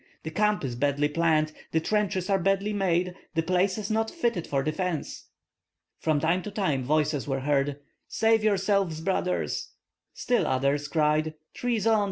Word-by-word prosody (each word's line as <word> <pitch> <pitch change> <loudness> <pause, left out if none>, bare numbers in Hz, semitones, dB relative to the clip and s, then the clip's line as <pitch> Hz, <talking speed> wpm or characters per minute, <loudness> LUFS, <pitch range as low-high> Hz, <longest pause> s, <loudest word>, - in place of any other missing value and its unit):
"The 160 - -5
camp 210 0 +1
is 125 -3 -3
badly 145 +3 +1
planned, 155 -1 +2 0.2
the 160 - +4
trenches 190 0 0
are 195 -1 +2
badly 195 +3 +1
made, 180 -2 +1 0.2
the 165 - +2
place 185 +3 +1
is 215 +1 -4
not 220 +1 +1
fitted 235 - -1
for 135 -1 0
defence." 160 +1 -3 0.7
From 155 -2 +1
time 170 +5 +1
to 210 - -6
time 185 -11 0
voices 150 +1 0
were 135 -1 -1
heard: 140 0 +1 0.3
"Save 225 0 +2
yourselves, 195 -5 +1
brothers!" 180 +1 -1 0.4
Still 245 -1 +1
others 140 +2 +1
cried: 155 +1 +1 0.2
"Treason! 225 -3 +1
170 Hz, 155 wpm, -27 LUFS, 150-200 Hz, 0.7 s, the